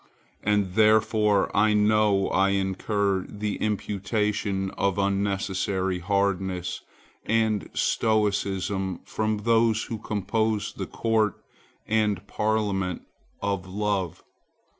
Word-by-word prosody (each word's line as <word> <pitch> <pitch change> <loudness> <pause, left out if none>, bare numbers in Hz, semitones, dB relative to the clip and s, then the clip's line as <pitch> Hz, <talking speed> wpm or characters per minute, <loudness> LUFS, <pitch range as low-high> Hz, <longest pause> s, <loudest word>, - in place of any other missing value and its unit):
And 105 -3 +1
therefore 110 -1 +3
I 105 +1 +4
know 105 -2 +3
I 95 +1 +3
incur 95 0 0
the 105 0 -3
imputation 105 -1 -1
of 100 -1 -1
unnecessary 95 -1 0
hardness 95 -1 -1 0.4
and 110 -2 +1
stoicism 100 -3 0
from 110 0 -1
those 115 0 +3
who 115 - -5
compose 105 +1 -1
the - - -5
Court 110 -3 +1 0.5
and 105 -3 +1
Parliament 100 -4 -1 0.4
of 100 -2 -1
Love. 100 -2 -2
100 Hz, 95 wpm, -26 LUFS, 95-110 Hz, 0.5 s, I